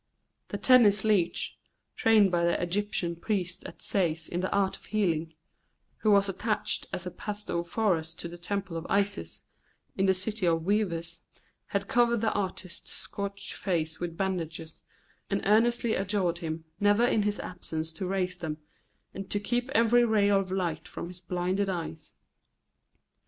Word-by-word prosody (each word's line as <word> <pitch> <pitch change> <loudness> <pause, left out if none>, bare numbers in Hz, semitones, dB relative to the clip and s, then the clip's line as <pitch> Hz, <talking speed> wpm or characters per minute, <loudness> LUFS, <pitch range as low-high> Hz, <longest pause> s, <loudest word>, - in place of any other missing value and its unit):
The - - -4
Tennis 215 -6 +6
leech, 200 -6 +1 0.4
trained 215 -4 +5
by 170 -1 +2
the 170 0 +2
Egyptian 175 -1 -1
priests 185 0 -2
at - - -11
Sais 165 -5 0
in 175 - -3
the 185 - -1
art 195 -1 +2
of - - -13
healing, 165 -7 0 0.6
who 215 - +1
was 200 -1 +6
attached 210 +3 -1
as 180 - -4
a 180 - -4
pastophorus 175 -4 -1
to 170 - -5
the 175 +1 -10
Temple 190 -1 -3
of 165 - -6
Isis, 200 0 -1 0.5
in 195 0 +2
the 190 - +4
city 190 +1 0
of 165 -1 +2
weavers, 170 -5 0 0.5
had 200 0 -2
covered 235 -1 +3
the 220 -1 +1
artist's 185 -3 -4
scorched 200 0 -4
face 165 -4 -1
with 170 -1 -4
bandages, 165 -4 -3 0.5
and 200 0 0
earnestly 230 +2 +3
adjured 190 -3 0
him 160 -1 -4
never 205 +3 +4
in 225 -3 +3
his 205 0 0
absence 165 -3 -4
to 170 +3 -4
raise 185 -1 -1
them, 155 -3 -3 0.6
and 195 0 -7
to 205 - 0
keep 240 +4 -1
every 240 -1 +5
ray 215 -3 +3
of 195 -2 +2
light 175 -4 -2
from 170 - -6
his 180 0 -11
blinded 185 +2 -1
eyes. 165 -4 -5
190 Hz, 155 wpm, -29 LUFS, 170-205 Hz, 0.6 s, Tennis